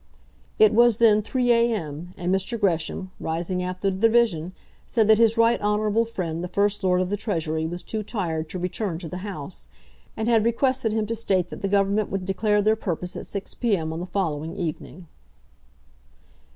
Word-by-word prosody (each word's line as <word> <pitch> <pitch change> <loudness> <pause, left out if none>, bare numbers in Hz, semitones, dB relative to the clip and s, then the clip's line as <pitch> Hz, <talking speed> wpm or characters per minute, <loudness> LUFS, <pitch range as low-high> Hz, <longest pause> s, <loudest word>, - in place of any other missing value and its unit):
It 215 0 +6
was 235 -1 +5
then 215 -2 +5
3 245 +3 0
a.m., 180 -8 0
and 180 +1 -1
Mr. 195 +5 -1
Gresham, 185 -1 -1
rising 175 +3 -2
after 185 +2 -1
the 190 - -4
division, 220 -6 +2 0.3
said 225 -4 +2
that 220 0 +6
his 230 0 +4
right 230 +1 +3
honourable 210 +2 +1
friend 175 -7 -4
the - - -3
First 200 +2 0
Lord 180 -1 +3
of 185 - -1
the 205 - -1
Treasury 160 -7 -2
was 175 +2 -6
too 220 - -3
tired 165 -7 -3
to 185 - -5
return 180 0 -3
to 170 0 -7
the 180 - -6
House, 185 -4 -7 0.5
and 220 - -2
had 230 -2 +4
requested 240 0 +1
him 215 0 0
to 225 - -3
state 190 -6 0
that - - -8
the 195 - 0
Government 200 +1 +1
would 195 -1 -3
declare 205 +2 +1
their 215 +1 +4
purpose 180 -4 -4
at - - -6
6 200 -1 -5
p.m. 185 -10 -1
on 160 - -4
the 180 - -5
following 165 -3 -2
evening. 170 +1 -5
195 Hz, 190 wpm, -24 LUFS, 175-220 Hz, 0.5 s, It